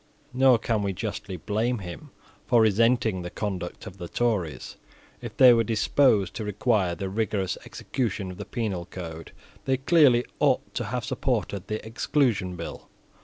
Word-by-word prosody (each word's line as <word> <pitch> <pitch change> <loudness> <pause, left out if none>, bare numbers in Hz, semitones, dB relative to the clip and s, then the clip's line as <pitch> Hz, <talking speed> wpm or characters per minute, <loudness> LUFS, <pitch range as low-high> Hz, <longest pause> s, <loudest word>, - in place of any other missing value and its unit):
Nor 130 -1 +5
can 115 -1 -1
we 100 -1 -1
justly 100 -1 -5
blame 110 +7 -1
him 95 - -8 0.4
for 120 - +4
resenting 110 -2 +3
the 90 - -5
conduct 90 -3 -5
of 95 +1 -10
the 85 - -5
Tories 95 - -2 0.4
If - - -8
they 130 -2 +9
were 115 -1 +3
disposed 110 -2 +2
to 110 - -3
require 105 -3 +1
the 95 +3 -4
rigorous 100 -1 -1
execution 105 -7 -3
of 90 - -10
the - - -6
penal 100 -8 -3
code, 80 -3 -8 0.3
they 135 0 +2
clearly 135 -4 +4
ought 135 -3 +1
to 120 - -2
have 120 +2 -3
supported 105 -6 -2
the 110 0 -4
Exclusion 110 -5 0
Bill. 85 -1 -8
110 Hz, 160 wpm, -26 LUFS, 95-120 Hz, 0.4 s, they